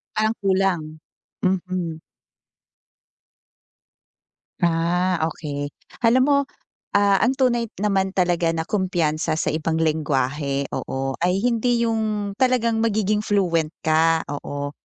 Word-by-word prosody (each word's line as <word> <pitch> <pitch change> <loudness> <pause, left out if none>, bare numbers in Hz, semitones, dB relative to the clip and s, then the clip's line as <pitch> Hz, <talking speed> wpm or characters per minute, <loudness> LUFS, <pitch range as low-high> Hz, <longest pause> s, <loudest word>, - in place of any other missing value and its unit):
Parang 215 +1 +2
kulang. 195 -3 +1 0.6
Mhm. 185 -3 -1 2.6
Ah, 175 +2 +1
okey. 145 -3 -4 0.3
Alam 245 +2 +4
mo, 285 0 +3 0.6
ah, 200 -1 +4
ang 250 +4 +2
tunay 240 -3 +1
naman 195 -1 0
talaga 175 -2 +2
na 160 - -1
kumpiyansa 170 -5 0
sa 160 - 0
ibang 160 +1 -1
lengguwahe, 145 -3 0
oo, 135 0 -3
ay 180 +4 +1
hindi 240 0 +2
'yung 215 -3 -1
talagang 240 -3 +2
magiging 215 -2 +1
fluent 175 -7 +1
ka 160 +1 +3
oo, 145 0 -4
185 Hz, 105 wpm, -22 LUFS, 160-215 Hz, 2.6 s, Alam